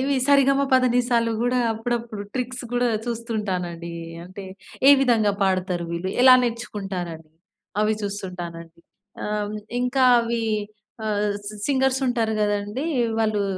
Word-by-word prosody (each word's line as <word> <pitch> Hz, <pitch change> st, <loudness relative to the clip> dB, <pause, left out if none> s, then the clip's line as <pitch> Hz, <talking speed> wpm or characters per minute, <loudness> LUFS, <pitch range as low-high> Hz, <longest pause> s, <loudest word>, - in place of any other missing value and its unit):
ఇవి 275 Hz, +1 st, +1 dB
సరిగమ 275 Hz, -1 st, +4 dB
పదనిసాలు 245 Hz, -2 st, +3 dB
గూడా 245 Hz, +1 st, +1 dB
అప్పుడప్పుడు 225 Hz, -1 st, -3 dB
ట్రిక్స్ 250 Hz, 0 st, -3 dB
గూడా 245 Hz, 0 st, +2 dB, 0.2 s
చూస్తుంటానండి. 190 Hz, -8 st, -3 dB, 0.3 s
అంటే, 185 Hz, +2 st, -9 dB, 0.4 s
ఏ -, -, +11 dB
విధంగా 230 Hz, -6 st, +3 dB
పాడతారు 185 Hz, -2 st, 0 dB
వీళ్ళు, 170 Hz, +2 st, -3 dB
ఎలా 255 Hz, 0 st, +9 dB
నేర్చుకుంటారని 195 Hz, -9 st, -4 dB, 0.5 s
అవి 215 Hz, +1 st, +2 dB
చూస్తుంటానండి. 175 Hz, -4 st, -6 dB, 0.4 s
ఆహ్, 210 Hz, 0 st, -2 dB, 0.2 s
ఇంకా 250 Hz, +1 st, +2 dB, 0.2 s
అవి 230 Hz, 0 st, -2 dB, 0.6 s
ఆహ్, 210 Hz, 0 st, 0 dB, 0.2 s
సి 215 Hz, -, -7 dB
సింగర్స్ 265 Hz, -1 st, +2 dB
ఉంటారు 230 Hz, -3 st, 0 dB
గదండీ! 205 Hz, +7 st, -1 dB, 0.3 s
వాళ్ళు 215 Hz, -2 st, +1 dB
220 Hz, 115 wpm, -23 LUFS, 195-245 Hz, 0.6 s, ఏ